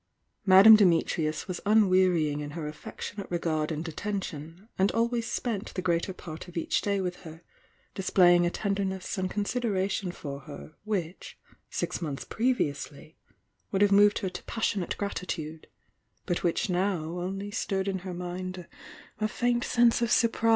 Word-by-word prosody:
Madame 195 +4 +10
Dimi 180 -6 +4
trius 155 -3 -2
was 185 -2 -4
unwearying 185 -8 +3
in 145 0 -5
her 155 -2 -4
affectionate 195 +6 -7
regard 160 -3 -1
and 160 +2 -4
attention, 170 0 -5
and 190 +1 +3
always 230 0 0
spent 225 -4 -3
the 185 - -1
greater 170 +1 0
part 165 -2 -9
of 175 - -9
each 165 - 0
day 200 -1 0
with 180 -1 -3
her, 165 -1 -12 0.5
displaying 175 -2 +4
a 175 - +2
tenderness 195 0 -2
and 185 0 -1
considera 205 -1 -1
tion 190 -2 -2
for 140 -5 -7
her 145 +2 -11
which 185 -5 -4 0.3
six - - -3
months 145 -5 -4
previously 155 - -2 0.6
would 195 0 +3
have 205 - +4
moved 205 +1 +6
her 190 - -2
to 180 0 -8
psseionate 205 -5 -2
gratitude, 165 -5 -4 0.6
but 175 - -1
which 175 +3 0
now 185 -2 0
ouly 185 +5 -4
stirred 195 -3 -1
in 190 -1 -1
her 185 -1 -6
mind 180 0 -5 0.5
a 215 - +1
faint 240 +2 0
sense 240 -1 +3
of 235 - +1
surprise. 230 -1 +3
185 Hz, 160 wpm, -28 LUFS, 165-205 Hz, 0.6 s, Madame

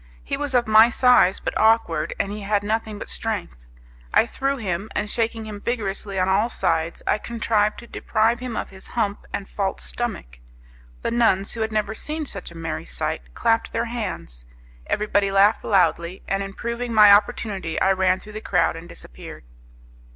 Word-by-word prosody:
He - - -2
was 290 -3 -2
of 240 -1 +4
my 220 +2 +7
size, 245 -6 +4
but - - -4
awkward, 225 +1 +2
and 200 - -1
he 210 +1 -6
had 205 0 0
nothing 215 0 -2
but - - -7
strength. 185 - -5 0.4
I - - +5
threw 275 +3 -2
him, 200 -2 -3
and 210 - -1
shaking 225 0 -2
him 210 -2 -8
vigorously 205 -4 -3
on 185 0 +2
all 200 +5 +2
sides 170 -6 -1
I 210 - +1
contrived 215 -2 0
to 235 - -10
deprive 230 0 0
him 250 -2 -5
of - - -4
his 190 0 -12
hump 210 -3 -1
and 195 - -4
false 195 -2 -3
stomach. 195 - -4 0.6
The - - -1
nuns, 225 -5 +2
who 230 - -5
had 220 0 -1
never 215 0 -1
seen 305 +7 -4
such 195 -8 -6
a 170 - -12
merry 165 -1 -4
sight, - - -4
clapped 225 0 +1
their 230 - 0
hands, 185 - -5 0.4
everybody 205 -1 +1
laughed 200 +2 +4
loudly, 180 -2 +1
and 195 0 0
improving 235 +5 -4
my 210 -2 +8
opportunity 200 -4 +2
I 195 - +3
ran 185 -1 +2
through 210 - -12
the 215 - -6
crowd 180 -6 +1
and 165 +2 -10
disappeared. - - -10
210 Hz, 180 wpm, -23 LUFS, 190-225 Hz, 0.6 s, my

